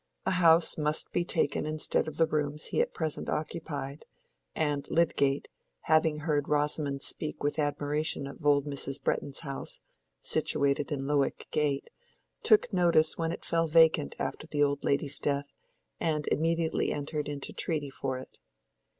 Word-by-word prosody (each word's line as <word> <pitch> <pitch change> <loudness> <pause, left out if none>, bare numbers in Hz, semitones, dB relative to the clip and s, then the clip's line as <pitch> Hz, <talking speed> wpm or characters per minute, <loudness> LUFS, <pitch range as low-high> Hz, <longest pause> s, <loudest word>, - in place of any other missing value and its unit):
A - - +1
house 170 -3 +4
must 150 0 0
be 175 - +1
taken 160 -4 0
instead 155 0 +1
of 155 -1 -6
the 165 - +5
rooms 150 -1 -1
he - - +3
at 485 - -1
present 160 -2 -2
occupied; 150 -2 -4 0.5
and 145 -2 -1
Lydgate, 145 -4 +2 0.3
having 155 -1 +2
heard 145 -2 0
Rosamond 145 -1 0
speak 155 - -2
with 145 +2 0
admiration 145 0 0
of 140 +3 -9
old 145 -1 +3
Mrs. 140 -1 -3
Bretton's 135 0 -2
house 140 -4 -5 0.4
(situated 140 - +1
in 135 -2 -2
Lowick 140 -1 0
Gate), 145 -2 0 0.5
took 435 - +4
notice 170 -4 +4
when 165 0 0
it - - -7
fell 165 0 +1
vacant 160 -1 +4
after 155 - -4
the 145 -2 +1
old 140 0 0
lady's 140 0 0
death, 140 0 -1 0.5
and 150 -2 -1
immediately 165 +1 +1
entered 150 +1 -3
into 145 -1 -4
treaty 150 -4 -1
for 135 -1 -3
it. 130 - -12
150 Hz, 150 wpm, -29 LUFS, 140-160 Hz, 0.5 s, the